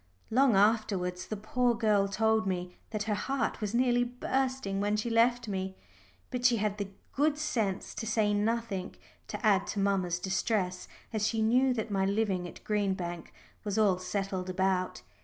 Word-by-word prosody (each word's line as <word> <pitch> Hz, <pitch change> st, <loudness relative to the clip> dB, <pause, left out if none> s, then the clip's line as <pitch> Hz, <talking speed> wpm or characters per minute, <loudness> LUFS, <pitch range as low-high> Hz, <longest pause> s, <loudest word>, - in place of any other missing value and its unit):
Long 255 Hz, -1 st, +4 dB
afterwards 195 Hz, -4 st, +2 dB
the 215 Hz, -, -4 dB
poor 240 Hz, +3 st, +1 dB
girl 210 Hz, -3 st, +3 dB
told 220 Hz, +1 st, +1 dB
me 180 Hz, -1 st, -3 dB
that 215 Hz, -1 st, -2 dB
her 215 Hz, 0 st, -1 dB
heart 265 Hz, +3 st, -1 dB
was 210 Hz, +1 st, -2 dB
nearly 245 Hz, 0 st, +3 dB
bursting 250 Hz, -4 st, -1 dB
when 205 Hz, +1 st, +1 dB
she 230 Hz, +2 st, -2 dB
left 240 Hz, +1 st, +3 dB
me, 190 Hz, -1 st, -3 dB, 0.6 s
but 250 Hz, -2 st, -3 dB
she 245 Hz, -1 st, +5 dB
had 210 Hz, 0 st, -1 dB
the 200 Hz, -1 st, -3 dB, 0.2 s
good 295 Hz, +1 st, +2 dB
sense 225 Hz, -11 st, -1 dB
to 225 Hz, -, -5 dB
say 215 Hz, -2 st, +2 dB
nothing 210 Hz, -2 st, -1 dB, 0.3 s
to -, -, -5 dB
add 200 Hz, -2 st, +4 dB
to 205 Hz, -, -3 dB
mamma's 190 Hz, -3 st, +1 dB
distress, 190 Hz, 0 st, -1 dB, 0.3 s
as 215 Hz, -1 st, +1 dB
she 220 Hz, 0 st, 0 dB
knew 250 Hz, +4 st, +4 dB
that 220 Hz, -2 st, -3 dB
my 195 Hz, -1 st, +1 dB
living 195 Hz, -3 st, 0 dB
at -, -, -12 dB
Green 205 Hz, -2 st, +1 dB
Bank 175 Hz, -2 st, -6 dB, 0.3 s
was 205 Hz, 0 st, -2 dB
all 200 Hz, -4 st, +3 dB
settled 185 Hz, 0 st, -3 dB
about. 185 Hz, 0 st, 0 dB
210 Hz, 175 wpm, -30 LUFS, 190-230 Hz, 0.6 s, she